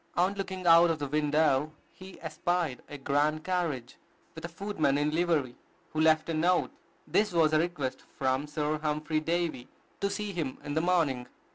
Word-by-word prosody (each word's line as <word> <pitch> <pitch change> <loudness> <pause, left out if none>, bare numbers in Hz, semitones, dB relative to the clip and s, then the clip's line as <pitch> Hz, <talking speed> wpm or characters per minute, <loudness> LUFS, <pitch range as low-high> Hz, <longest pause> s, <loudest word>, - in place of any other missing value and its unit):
On 180 +3 +2
looking 190 -2 -5
out 170 0 +7
of 165 - 0
the 145 - -3
window, 150 0 +2 0.2
he 190 0 -12
espied 175 -7 -1
a 145 - -7
grand 145 +3 0
carriage, 165 -10 -2 0.4
with 160 - -10
a 170 - -4
footman 170 -6 0
in 145 +1 +1
livery, 160 -6 +1 0.4
who 155 - 0
left 155 -1 +4
a 165 - -2
note. 175 +3 +2 0.3
This 210 -1 +1
was 160 -3 +3
a 155 - +5
request 155 -6 -2 0.2
from 130 +3 0
Sir 150 0 -1
Humphry 155 +1 -1
Davy 165 -5 -2 0.3
to 200 - 0
see 205 0 -3
him 155 -7 -3
in 145 -1 -4
the 160 - +1
morning. 160 -8 +1
155 Hz, 175 wpm, -29 LUFS, 150-175 Hz, 0.4 s, out